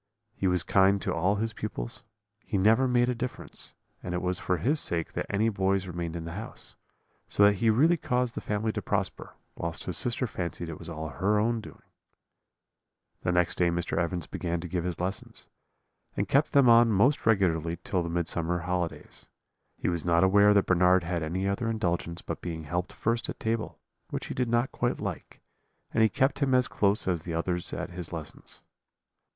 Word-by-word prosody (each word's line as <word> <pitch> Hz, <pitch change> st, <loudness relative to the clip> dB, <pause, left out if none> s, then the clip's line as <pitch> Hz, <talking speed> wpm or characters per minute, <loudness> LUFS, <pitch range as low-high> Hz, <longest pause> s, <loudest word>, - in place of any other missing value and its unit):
He 95 Hz, -, -1 dB
was 90 Hz, -3 st, +2 dB
kind 95 Hz, +3 st, +4 dB
to -, -, -1 dB
all 95 Hz, +5 st, +1 dB
his 110 Hz, +2 st, -2 dB
pupils; 85 Hz, -, -5 dB, 0.4 s
he -, -, -2 dB
never 110 Hz, +7 st, +4 dB
made 120 Hz, -1 st, +3 dB
a 125 Hz, -, +1 dB
difference: 125 Hz, +1 st, -6 dB, 0.3 s
and 90 Hz, 0 st, -4 dB
it 90 Hz, -, -1 dB
was 90 Hz, 0 st, +1 dB
for 90 Hz, -, 0 dB
his 145 Hz, -, +2 dB
sake 85 Hz, -, +2 dB
that -, -, -3 dB
any 105 Hz, +3 st, +1 dB
boys 95 Hz, -2 st, +1 dB
remained 85 Hz, -2 st, -4 dB
in 85 Hz, -1 st, -5 dB
the 85 Hz, -, -5 dB
house; 105 Hz, +5 st, -7 dB, 0.5 s
so 100 Hz, -, +3 dB
that 100 Hz, 0 st, +5 dB
he 115 Hz, +3 st, +2 dB
really 155 Hz, +10 st, +4 dB
caused 125 Hz, -4 st, 0 dB
the -, -, -5 dB
family 105 Hz, +1 st, -1 dB
to -, -, -4 dB
prosper, -, -, -3 dB, 0.2 s
whilst 85 Hz, 0 st, -4 dB
his 90 Hz, -, -3 dB
sister 125 Hz, +1 st, +1 dB
fancied 85 Hz, -5 st, -4 dB
it 80 Hz, -, -7 dB
was 85 Hz, -, -8 dB
all 80 Hz, -1 st, -5 dB
her 95 Hz, +10 st, +1 dB
own 115 Hz, +2 st, +1 dB
doing. -, -, -13 dB, 1.4 s
"The 90 Hz, -, 0 dB
next 90 Hz, -1 st, +1 dB
day 90 Hz, -1 st, +4 dB
Mr. 85 Hz, 0 st, -1 dB
Evans 85 Hz, -1 st, -1 dB
began 85 Hz, -1 st, -3 dB
to 90 Hz, -, -6 dB
give 90 Hz, 0 st, -2 dB
his 90 Hz, -2 st, -3 dB
lessons; 95 Hz, +2 st, -4 dB, 0.7 s
and -, -, 0 dB
kept 140 Hz, +3 st, +2 dB
them 140 Hz, -3 st, +6 dB
on 115 Hz, 0 st, +7 dB
most 115 Hz, +8 st, +3 dB
regularly 85 Hz, -6 st, +2 dB
till 90 Hz, -, 0 dB
the 85 Hz, -, -3 dB
Midsummer 85 Hz, 0 st, -1 dB
holidays. 90 Hz, 0 st, -4 dB, 0.5 s
He -, -, -3 dB
was 85 Hz, -2 st, -1 dB
not 85 Hz, 0 st, +3 dB
aware 100 Hz, +2 st, +5 dB
that 100 Hz, -, +4 dB
Bernard 90 Hz, 0 st, +4 dB
had 85 Hz, 0 st, -2 dB
any 90 Hz, +5 st, -2 dB
other 115 Hz, +4 st, -1 dB
indulgence 85 Hz, -6 st, -2 dB
but -, -, -5 dB
being 80 Hz, -2 st, -5 dB
helped 90 Hz, +4 st, -3 dB
first 115 Hz, +1 st, -1 dB
at -, -, -6 dB
table, 110 Hz, 0 st, -2 dB, 0.3 s
which -, -, -4 dB
he -, -, -5 dB
did 125 Hz, -2 st, -1 dB
not 120 Hz, +2 st, +1 dB
quite -, -, -1 dB
like; -, -, -6 dB, 0.5 s
and -, -, +2 dB
he 110 Hz, -, +5 dB
kept 135 Hz, +5 st, +1 dB
him 135 Hz, -3 st, +2 dB
as 125 Hz, 0 st, +3 dB
close 100 Hz, 0 st, +1 dB
as 90 Hz, -3 st, 0 dB
the 85 Hz, 0 st, -5 dB
others 90 Hz, +1 st, 0 dB
at -, -, -4 dB
his 90 Hz, -2 st, -7 dB
lessons. 80 Hz, -3 st, -6 dB
95 Hz, 200 wpm, -28 LUFS, 85-110 Hz, 1.4 s, on